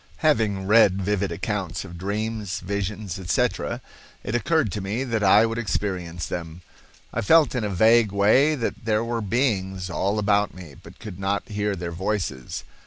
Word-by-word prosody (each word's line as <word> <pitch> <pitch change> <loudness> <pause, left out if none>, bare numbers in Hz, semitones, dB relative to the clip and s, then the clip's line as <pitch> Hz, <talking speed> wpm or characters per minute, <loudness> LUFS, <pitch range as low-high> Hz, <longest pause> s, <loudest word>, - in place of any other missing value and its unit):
Having 110 -10 +2
read 100 -2 +5
vivid 100 -1 0
accounts 95 +1 -3
of 90 -2 -10
dreams, 105 +2 -3
visions, 100 -1 -4
etc., 90 -2 -1 0.4
it 105 - -4
occurred 140 - +1
to 105 - -3
me 105 +7 -2
that 115 -5 -1
I 105 +3 +6
would 115 +1 -2
experience 90 -6 -3
them. 85 0 -6 0.5
I 115 - -1
felt 155 +7 +5
in 125 -3 -1
a 105 - -1
vague 110 +3 +4
way 110 +10 +4
that 115 -5 -4
there 110 0 +1
were 115 0 -2
beings 95 -5 -1
all 100 +4 0
about 105 0 +1
me 90 -6 -11
but - - -15
could 100 -5 -9
not 100 +1 -2
hear 105 -1 -1
their 85 -1 -5
voices. 90 -7 -3
100 Hz, 170 wpm, -24 LUFS, 95-110 Hz, 0.5 s, I